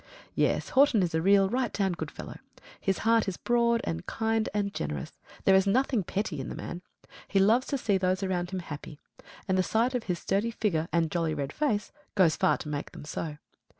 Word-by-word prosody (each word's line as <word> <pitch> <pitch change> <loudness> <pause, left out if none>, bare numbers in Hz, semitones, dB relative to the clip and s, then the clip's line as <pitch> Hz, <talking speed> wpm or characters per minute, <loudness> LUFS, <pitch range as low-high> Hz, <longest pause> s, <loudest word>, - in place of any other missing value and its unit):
Yes, - - +1
Horton 265 -7 +4
is 175 -2 -1
a 160 - +1
real 195 +2 +5
right 245 +3 0
down 195 -2 0
good 175 - -4
fellow. - - -9 0.4
His 195 -1 0
heart 225 -1 +4
is 190 - -2
broad 235 -1 +2
and 80 0 -3
kind 225 -1 0
and 200 -1 -1
generous. 75 -3 -5 0.2
There 195 - +5
is 190 +1 +4
nothing 245 0 +2
petty 190 -4 -3
in 135 - -5
the - - -5
man. 175 - -6 0.5
He 200 - 0
loves 220 +7 +4
to 280 - -1
see 205 -6 +1
those 185 +1 0
around 180 -2 -1
him 190 -1 -3
happy; 145 -2 -8 0.5
and 190 -1 +2
the - - +6
sight 230 +7 +1
of 250 -2 -2
his 180 -2 -1
sturdy 200 +6 0
figure 180 -8 -1
and 165 -2 +1
jolly 165 -3 0
red 140 -1 -3
face 220 -9 0 0.2
goes 180 -6 +4
far - - +2
to - - -8
make 145 -1 -4
them - - -9
so. 150 0 -4
195 Hz, 215 wpm, -28 LUFS, 170-225 Hz, 0.5 s, the